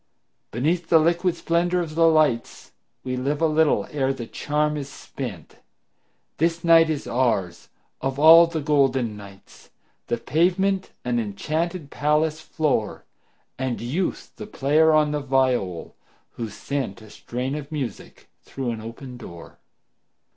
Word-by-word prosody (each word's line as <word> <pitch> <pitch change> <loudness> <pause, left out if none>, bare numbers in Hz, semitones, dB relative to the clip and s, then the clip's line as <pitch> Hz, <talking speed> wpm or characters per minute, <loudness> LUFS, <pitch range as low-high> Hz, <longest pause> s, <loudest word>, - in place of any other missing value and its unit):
Beneath 160 - -1
the 165 - +6
liquid 170 +2 +2
splendor 175 +1 0
of 165 -3 -4
the 165 +1 +4
lights 155 -7 +1 0.3
We 130 -1 -3
live 140 +3 -1
a 165 - +2
little 155 -1 +2
ere 135 -2 0
the 130 -3 -5
charm 150 +5 -1
is 140 -2 -5
spent; 135 - -8 0.8
This 165 +1 0
night 165 -1 +6
is 155 -3 -2
ours, 115 -8 -1 0.3
of 135 0 -2
all 165 +3 +8
the 165 -2 -3
golden 135 -6 +1
nights, 100 -1 -14 0.4
The 120 - -1
pavement 185 +8 +1 0.2
an 120 -1 0
enchanted 155 - -3
palace 150 +1 0
floor, 150 -10 -2 0.5
And 130 -3 -2
Youth 155 +11 -3
the - - -7
player 155 -2 +3
on 155 -1 +3
the 150 - -1
viol, 130 -10 0 0.4
who 115 -2 -5
sent 120 -4 -4
A 110 - -14
strain 125 +3 -4
of 150 0 -6
music 135 -9 -6 0.2
through 130 -3 -4
an 110 -2 -6
open 120 +3 -9
door. 85 -8 -12
145 Hz, 140 wpm, -23 LUFS, 125-160 Hz, 0.8 s, all